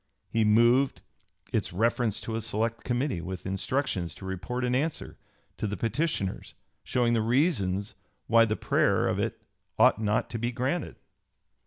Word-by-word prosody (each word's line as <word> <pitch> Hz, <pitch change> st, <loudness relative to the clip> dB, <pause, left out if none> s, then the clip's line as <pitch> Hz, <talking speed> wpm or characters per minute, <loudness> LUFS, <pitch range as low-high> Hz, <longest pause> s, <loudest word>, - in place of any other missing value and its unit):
He 115 Hz, -, +2 dB
moved 120 Hz, +5 st, +4 dB, 0.5 s
"its -, -, 0 dB
reference 115 Hz, +2 st, +1 dB
to 115 Hz, -, -5 dB
a 115 Hz, -, -1 dB
select 115 Hz, +1 st, -2 dB
committee, 125 Hz, -, -1 dB
with 90 Hz, +1 st, -6 dB
instructions 95 Hz, -1 st, -1 dB
to 95 Hz, -, -10 dB
report 110 Hz, +7 st, -3 dB
an 125 Hz, -, 0 dB
answer 145 Hz, +5 st, -2 dB, 0.4 s
to 110 Hz, -, -2 dB
the 105 Hz, 0 st, -3 dB
petitioners 115 Hz, -, -2 dB, 0.3 s
showing 120 Hz, -2 st, +1 dB
the 115 Hz, -, +2 dB
reasons 110 Hz, -, +1 dB, 0.3 s
why 115 Hz, 0 st, +5 dB
the 110 Hz, -1 st, -1 dB
prayer -, -, +2 dB
of -, -, 0 dB
it -, -, -3 dB, 0.3 s
ought 110 Hz, -, +5 dB
not 105 Hz, 0 st, +1 dB
to 115 Hz, -, -3 dB
be 120 Hz, +2 st, -1 dB
granted." 130 Hz, +7 st, -2 dB
115 Hz, 155 wpm, -28 LUFS, 105-125 Hz, 0.5 s, why